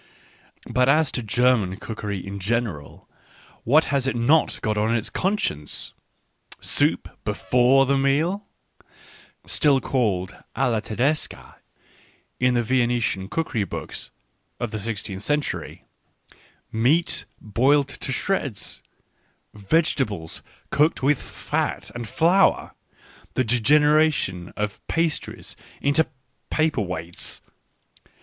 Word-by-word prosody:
But 125 +1 +2
as 150 0 +4
to 125 - -2
German 110 -3 +2
cookery 105 -4 -5
in 100 0 -6
general 100 - -3 0.3
— - - -26
what 150 +7 +4
has 135 -2 +1
it 135 - 0
not 140 +7 +3
got 110 -2 +1
on 110 +2 +1
its 115 - -2
conscience! 185 - -1 0.7
Soup - - +1 0.2
before 125 +2 +3
the 140 +1 +2
meal 160 +9 +1 1.0
(still 140 -3 +3
called 105 -9 -1 0.2
alia 120 -5 +2
tedesca 130 +9 -2 0.8
in 125 0 +3
the 120 - +2
Vene 120 0 +2
tian 95 -4 -2
cookery 145 -10 -1
booljs 95 - -6 0.5
of 120 -3 -3
the 110 - -3
sixteenth 100 -2 -4
century); 145 +6 -2 0.9
meat 155 +9 +2
boiled 135 +7 +2
to 135 - -6
shreds, 140 - -2 0.7
vegetables 105 - 0 0.3
cooked 150 -1 +2
with 140 0 +3
fat - - -3
and 120 -2 -5
flour; 180 - +3 0.6
the 130 - +3
degeneration 140 - +3
of 105 -1 -3
pastries 165 -2 -2 0.2
into 145 +3 +2 0.4
paper 155 -6 +1
weights 90 -3 -2
125 Hz, 110 wpm, -24 LUFS, 105-150 Hz, 1.0 s, as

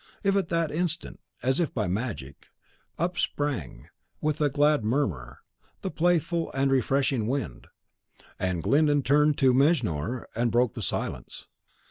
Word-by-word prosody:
At 195 -2 +1
that 165 -2 0
instant, 170 +1 -2 0.2
as 130 +4 +2
if 170 -5 -1
by 110 -4 0
magic, 90 - -4 0.5
up 175 +2 -1
sprang, 120 - -2 0.3
with 155 0 -1
a 145 - +3
glad 145 -2 +3
murmur, 100 - -1 0.4
the 190 - -2
playful 170 0 +1
and 135 -1 +2
freshening 135 -4 +1
wind: 120 - -3 0.7
and 90 -3 -1
Glyndon 145 -1 +3
turned 150 +3 +3
to 130 -2 +4
Mejnour 125 - +1
and 120 0 0
broke 120 0 +2
the 120 - -6
silence. 90 - -4
135 Hz, 135 wpm, -27 LUFS, 115-155 Hz, 0.7 s, to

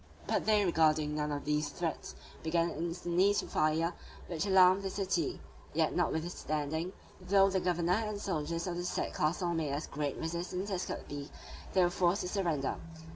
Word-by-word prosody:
But - - 0
disregarding 160 -7 +3 0.3
these 150 0 0
threats, 165 +2 -4 0.3
they - - -15
began 170 +1 +2
instantly 175 +4 +1
to - - 0
fire, 160 +3 +1 0.3
which 170 +3 -2
alarmed 190 0 +6
the 195 - -2
city; 190 -5 -1 0.4
yet - - +2
notwithstanding, 160 0 -1 0.3
though 195 +1 +4
the 190 - +2
governor 180 +3 +1
and 210 -1 -4
soldiers 165 -4 -2
of 175 -2 -3
the 175 - -2
said 180 - -2
castle 170 +3 0
made 160 -3 -1
as 145 +3 -2
great 145 -1 -3
resistance 175 +4 -3
as 185 -1 -1
could - - -5
be, 145 0 -6 0.4
they 185 - +5
were 175 - +3
forced 180 +2 +2
to - - -2
surrender. 170 -8 -1
175 Hz, 165 wpm, -32 LUFS, 155-185 Hz, 0.4 s, alarmed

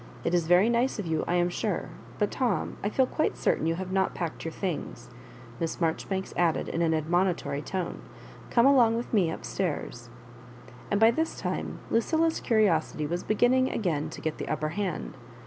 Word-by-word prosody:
It - - 0
is 170 -2 +2
very 180 +5 +5
nice 235 +2 +1
of 205 - -3
you, 160 -1 0
I 175 - +1
am 175 0 +2
sure; 200 0 -2 0.3
but, 210 - 0
Tom, 245 -7 -1
I 205 - +1
feel 260 +4 +3
quite 310 - -1
certain 160 - +1
you 165 - +1
have 185 +1 -5
not 190 0 +1
packed 170 -2 -4
your 165 - -3
things," 175 -8 -5 0.5
Miss 165 - -2
Marjoribanks 190 +3 -1
add 170 -2 +2
ed, - - -4
in 170 - -2
an 160 -1 +2
admonitory 170 -1 0
tone. 180 +3 -4 0.2
" - - -17
Come 235 0 +4
along 245 -5 +5
with 240 - -5
me 190 -7 +3
up 160 - -6
stairs." 145 -9 -3 0.8
And 200 - +1
by 225 +1 +7
this 320 +5 -2
time - - -3
Lucilla's 320 +8 +2
curiosity 185 - +1
was 175 +4 -2
be 215 - 0
ginning 255 +4 +3
again 160 -8 -1
to - - -9
get 160 -1 -3
the - - -4
upper 155 0 -1
hand. 185 -4 -3
185 Hz, 200 wpm, -28 LUFS, 165-225 Hz, 0.8 s, by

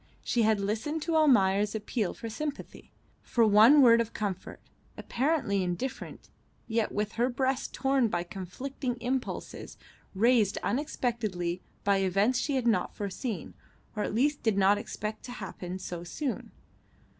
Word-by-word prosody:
She 240 - +1
had 220 -1 +3
listened 225 +10 -2
to 330 -1 -1
Almayer's 210 -9 +4
appeal 210 -1 -2
for 230 - -7
sympathy, 290 +6 -6 0.3
for 235 -2 +2
one 220 +8 +7
word 235 -1 +7
of 230 -1 -4
comfort, 200 -4 -4 0.4
apparently 260 -7 0
indifferent, 180 +9 -5 0.4
yet 225 -1 0
with 210 +1 -2
her 240 +2 +2
breast 260 +1 -1
torn 270 -3 +2
by 175 -5 -1
conflicting 245 +8 -5
impulses 250 +2 -4 0.4
raised 220 -1 +3
unexpectedly 220 - -2 0.2
by 200 -1 +3
events 195 +6 +2
she 280 +1 -1
had 255 -2 0
not 230 -2 +1
foreseen, 200 - -4 0.4
or 210 - -2
at 210 - -2
least 285 +5 +1
did 220 -3 +1
not 200 +1 +4
expect 215 +1 -5
to 245 - -7
happen 185 -4 -6
so 175 -2 -6
soon. 260 - -4
220 Hz, 145 wpm, -29 LUFS, 200-255 Hz, 0.4 s, one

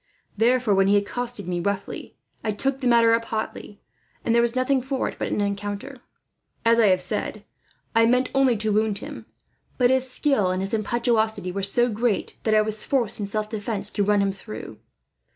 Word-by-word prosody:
Therefore 240 0 +3
when 195 0 +3
he 205 +1 +5
accosted 225 0 -3
me 175 -1 -1
roughly, 200 +2 -4 0.3
I 215 -2 -1
took 270 +5 -2
the 255 - 0
matter 230 -1 +5
up 230 0 +1
hotly, 215 -2 -5 0.4
and 230 - +2
there 235 - +5
was 235 +1 +1
nothing 255 +1 +2
for 265 +1 -2
it - - -7
but - - -1
an - - -1
encounter. 205 +6 -3 0.7
As 230 0 +5
I 220 - +5
have 185 -1 +3
said, 180 - -4 0.5
I 225 0 +5
meant 250 +2 +2
only 270 -4 +3
to 215 0 -1
wound 215 -1 +1
him; - - -9 0.5
but 250 -1 +4
his 260 0 +2
skill 255 -8 +2
and 185 0 -1
his 195 +3 -3
impetuosity 220 -3 0
were 195 +2 -3
so 240 +5 +2
great 225 -1 -1
that 220 -1 +3
I 215 - +6
was 215 0 -2
forced, 245 -7 0
in 205 - -2
self 215 +1 -2
defence, 210 -1 -4
to 205 - 0
run 205 0 +3
him 195 - +1
through. 110 - -9
220 Hz, 200 wpm, -24 LUFS, 200-245 Hz, 0.7 s, I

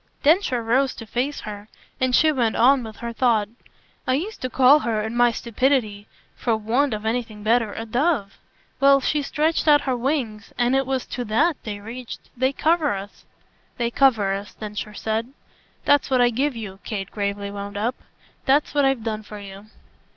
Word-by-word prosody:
Densher 295 - +3
rose 255 +4 +1
to 225 - -9
face 250 +7 -2
her, 205 -1 -8 0.3
and 255 -1 +2
she 310 0 +5
went 240 -6 0
on 265 +3 +5
with 220 -1 -8
her 235 0 -6
thought. 225 -4 +2 0.6
"I 255 - +3
used 395 +10 -4
to 255 - -2
call 265 +4 +6
her, 225 -6 -1
in 220 +2 -4
my 240 0 +4
stupidity 230 -3 0 0.3
for 230 -3 0
want 235 +4 +1
of 210 +1 -7
anything 220 -2 -3
better 225 -1 +2
a 225 - -5
dove. 240 - 0 0.4
Well 275 0 +6
she 295 +3 0
stretched 310 +3 0
out 295 -1 +6
her 260 -2 -1
wings, 245 -5 -2
and 245 +2 +2
it 270 -1 +1
was 265 -1 -1
to 245 - -4
THAT 280 +8 +1
they 205 -2 -4
reached. 235 +4 -9
They 260 +2 +1
cover 310 -3 +1
us." 195 +1 -9 0.5
"They 235 -1 -1
cover 225 -8 +3
us," 200 +1 -6
Densher 210 0 -6
said. 225 +5 -3 0.5
"That's 285 -1 +3
what 260 -1 +2
I 245 0 +4
give 270 +3 0
you," 200 -4 -7
Kate 195 -3 -5
gravely 200 -1 -3
wound 200 0 -6
up. 225 +5 0 0.5
"That's 285 +3 +3
what 285 -1 +3
I've 270 -4 +1
done 220 -1 -3
for 210 0 -10
you." 200 +1 -11
240 Hz, 190 wpm, -23 LUFS, 215-270 Hz, 0.6 s, call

